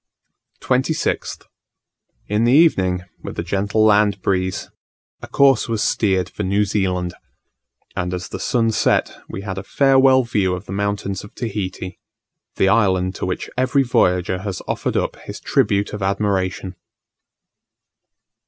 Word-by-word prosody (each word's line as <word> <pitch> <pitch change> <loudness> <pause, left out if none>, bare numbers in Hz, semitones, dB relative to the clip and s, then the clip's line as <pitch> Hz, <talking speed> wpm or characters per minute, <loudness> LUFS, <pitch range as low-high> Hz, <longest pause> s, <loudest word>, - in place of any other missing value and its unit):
26th. 130 +5 -1 0.8
In 105 +2 0
the 120 - +3
evening, 95 - +3 0.2
with - - -8
a - - -2
gentle 100 +4 +1
land 105 -1 +4
breeze, 95 +1 -1 0.5
a - - -8
course 135 -4 +3
was 110 -2 0
steered 95 -5 +1
for - - -7
New 100 +1 +1
Zealand; 90 -3 -1 0.8
and 90 0 -2
as 90 0 -5
the - - -6
sun 115 -3 +1
set, 110 - +1
we 95 - -6
had 95 -1 -5
a - - -7
farewell 135 +2 +4
view 100 -6 0
of 90 +3 -8
the - - -9
mountains 100 -1 -2
of 105 - -13
Tahiti 95 -5 -5 0.6
the 95 - +2
island 95 -3 +2
to - - -4
which 90 - -3
every 130 +2 +2
voyager 90 -6 +1
has 95 -1 -4
offered - - -1
up - - -1
his - - -9
tribute 100 -1 +1
of 105 - -5
admiration. 95 -1 -1
100 Hz, 145 wpm, -20 LUFS, 95-110 Hz, 0.8 s, land